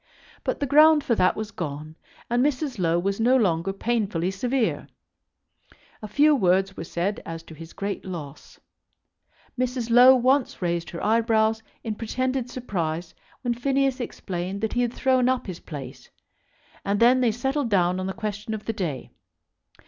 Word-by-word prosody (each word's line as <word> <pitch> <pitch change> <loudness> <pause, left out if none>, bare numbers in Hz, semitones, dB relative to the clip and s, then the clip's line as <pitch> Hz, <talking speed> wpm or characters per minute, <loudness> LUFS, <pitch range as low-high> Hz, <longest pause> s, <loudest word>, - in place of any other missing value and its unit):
But - - -2
the 285 - 0
ground 305 +2 +6
for 235 - +1
that 185 -4 +3
was 215 -1 -5
gone, 155 -3 -6 0.3
and 240 +1 +1
Mrs. 280 -4 -1
Low 170 -1 +2
was 195 +3 -1
no 245 +3 +4
longer 185 -5 +1
painfully 195 -4 -1
severe. 245 +5 -1 1.1
A 215 - -6
few 295 +8 +4
words 190 -3 +2
were - - -6
said 175 +5 -2
as 165 0 -7
to 165 - -13
his 165 +1 -11
great 200 0 -4
loss. 160 -7 -9 1.0
Mrs. 250 -2 -1
Low 250 +2 +8
once 260 +1 +1
raised 170 -2 -2
her 170 - -5
eyebrows 220 0 +2 0.2
in 225 - -2
pretended 255 +3 -2
surprise 175 -9 -3 0.3
when 245 -1 +1
Phineas 270 +2 0
explained 190 -4 -5
that 220 - -1
he 245 - +1
had 240 -1 0
thrown 255 -1 +2
up 255 -1 0
his 185 -4 -6
place, 145 -5 -9 0.7
and 200 +1 0
then 250 +2 +5
they 240 -3 +3
settled 265 +3 -1
down 180 -2 +2
on 185 - -3
the 190 - -3
question 215 0 -4
of 210 - -9
the 225 - -2
day. 170 - -4
220 Hz, 165 wpm, -25 LUFS, 180-250 Hz, 1.1 s, Low